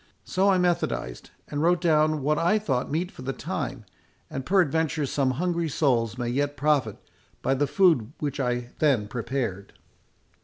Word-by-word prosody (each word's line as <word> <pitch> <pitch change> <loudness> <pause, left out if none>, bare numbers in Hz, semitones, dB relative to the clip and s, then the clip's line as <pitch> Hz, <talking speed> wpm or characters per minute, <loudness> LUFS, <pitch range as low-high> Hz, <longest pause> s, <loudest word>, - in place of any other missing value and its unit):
So 195 +2 +1
I 190 - +4
methodised, 175 - -1 0.2
and 145 0 -3
wrote 175 +2 +3
down 155 -3 +2
what 150 +2 +1
I 175 +6 +3
thought 135 -12 -1
meet 175 +5 -1
for - - -12
the 135 +1 -3
time, - - -4 0.5
and 135 - -4
peradventure 160 -4 +2
some 135 0 0
hungry 170 -1 0
souls 120 -6 +1
may 120 -1 -2
yet 145 +3 -1
profit 140 -6 +1 0.5
by - - +2
the 140 +2 +1
food 150 - +3
which 145 -1 -3
I 125 -2 -1
then 135 -9 +2
prepared." 115 -4 -4
145 Hz, 160 wpm, -26 LUFS, 125-165 Hz, 0.5 s, I